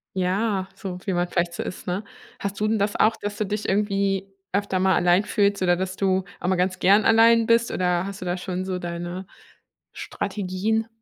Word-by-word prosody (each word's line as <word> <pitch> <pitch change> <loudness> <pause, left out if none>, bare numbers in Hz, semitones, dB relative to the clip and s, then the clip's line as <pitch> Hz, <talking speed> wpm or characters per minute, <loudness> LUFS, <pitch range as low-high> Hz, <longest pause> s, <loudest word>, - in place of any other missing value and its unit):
Ja, 190 +1 0
so 190 -2 -6
wie 195 - -1
man 175 0 +1
vielleicht 170 -1 -1
so - - -4
ist, - - -7
ne? 185 +4 -2 0.4
Hast 200 0 -4
du 215 - +1
denn 220 -1 +1
das 205 +1 0
auch, 225 +1 +3
dass 205 0 -5
du 215 - -1
dich 210 +2 -3
irgendwie 195 -1 0 0.2
öfter 200 -1 0
mal 190 -1 +3
allein 180 +3 +4
fühlst 200 -2 +1
oder 175 -1 +3
dass 185 +1 -3
du 190 -1 +1 0.2
auch 175 - -3
mal 190 - +2
ganz 185 +1 0
gern 200 +3 +5
allein 230 0 +6
bist, 230 +1 +3
oder 180 -1 0
hast 200 0 -7
du - - -5
da 180 +1 -1
schon 185 0 -4
so 185 -1 -3
deine 175 +2 -5 0.7
Strategien? 210 +3 -2
190 Hz, 205 wpm, -24 LUFS, 180-205 Hz, 0.7 s, allein